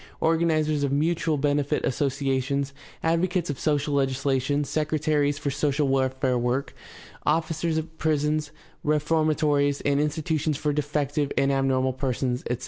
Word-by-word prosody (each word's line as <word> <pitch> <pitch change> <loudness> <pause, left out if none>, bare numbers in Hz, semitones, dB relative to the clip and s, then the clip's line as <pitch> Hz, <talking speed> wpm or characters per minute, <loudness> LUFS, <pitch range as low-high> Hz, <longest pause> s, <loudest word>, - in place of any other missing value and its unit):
organizers 160 -2 +2
of 140 - 0
mutual 160 +1 +1
benefit 145 0 0
associations, 135 0 -1 0.3
advocates 170 0 +1
of 140 - -7
social 145 -1 0
legislation, 135 +1 +1
secretaries 150 -1 0
for 145 -1 -2
social 145 0 0
welfare 130 -1 +1
work, 125 +3 -1 0.5
officers 160 +1 0
of 160 0 -5
prisons, 150 -1 0 0.3
reforma 155 +1 +1
tories, 145 -2 +2
and 140 0 +1
institutions 150 0 0
for 150 0 -1
defective 145 0 -1
and 140 0 +3
abnormal 130 -1 +1
persons, 130 -1 -1
etc. 125 - 0
145 Hz, 130 wpm, -25 LUFS, 135-155 Hz, 0.5 s, and